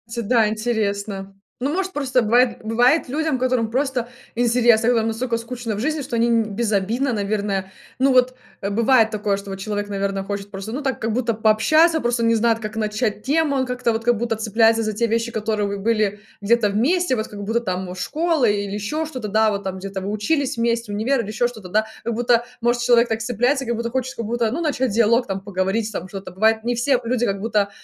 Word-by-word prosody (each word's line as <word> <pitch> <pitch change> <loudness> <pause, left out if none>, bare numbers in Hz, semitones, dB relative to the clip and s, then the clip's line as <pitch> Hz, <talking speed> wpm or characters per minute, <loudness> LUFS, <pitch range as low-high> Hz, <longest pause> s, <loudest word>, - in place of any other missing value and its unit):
Ти 235 - -2
да, 225 0 +3
интересно. 205 -3 -2 0.3
Ну, 280 +4 -1
может, 385 +1 -1
просто 260 -6 +1
бывает 240 +3 +3
бывает 245 +7 +2
людям, 305 -1 -1
которым 250 -3 0
просто 265 -2 -1 0.3
интересно, 240 -1 +3
которым 225 -2 +2
настолько 230 +1 -1
скучно 230 -1 -5
в - - -5
жизни, 310 +6 -1
что 240 - -4
они 230 0 +3
безобидно, 225 +4 0
наверное, 200 -2 -2 0.3
ну 270 0 +4
вот, 255 0 +3 0.3
э, 200 - -2
бывает 225 +2 +4
такое, 205 -2 -1
что 200 0 -9
вот 195 - -5
человек, 205 0 -3
наверно, 195 -1 -2
хочет 200 0 -5
просто, 195 +2 -6
ну 280 +4 -4
так 270 -2 -1
как 225 0 -1
будто 235 -1 0
пообщаться, 310 +10 +4
просто 240 -2 0
не 230 0 +3
знает, 225 0 +2
как 215 -1 -6
начать 215 0 -1
тему, 300 0 +1
он 260 -1 +1
как-то 250 -1 -1
вот 225 0 -2
как 240 -1 +3
будто 230 0 -1
цепляется 225 +1 +2
за 215 - -2
те 235 +3 0
вещи, 230 +1 -1
которые 210 -2 -2
были 210 -1 0 0.2
где-то 215 +1 +3
вместе, 265 - +1
вот 220 -2 -3
как 205 -1 -8
будто 225 +3 0
там 185 -4 -4
школы 305 - +1
или 200 -1 -3
еще 255 +10 -2
что-то, 255 -8 -6
да, 215 +1 +3
вот 200 -1 -3
там 190 0 -4
где-то 195 0 -5
вы 195 +2 -3
учились 250 +6 0
вместе, 230 -1 0
универ 235 +5 +1
или 200 - -7
еще 235 +3 0
что-то, 220 -6 -10
да. 215 +4 +2 0.2
Как 235 - -2
будто, 240 0 +2 0.2
может, 240 0 +1
человек 240 -1 +4
так 225 0 -1
цепляется, 250 +4 0
как 235 0 -1
будто 235 +1 -3
хочет, 260 +1 -2
как 230 - -4
будто, 230 0 0
ну, 325 +8 -2
начать 270 -6 0
диалог, 230 +3 +3
там 195 -1 -3
поговорить, 200 +3 -1
там 185 -3 -5
что-то. 195 0 -8
Бывает, 220 +4 +2
не 240 +1 0
все 250 +1 +1
люди 240 +1 0
как 195 -2 -1
будто, 210 -2 +1
230 Hz, 215 wpm, -21 LUFS, 210-245 Hz, 0.3 s, ну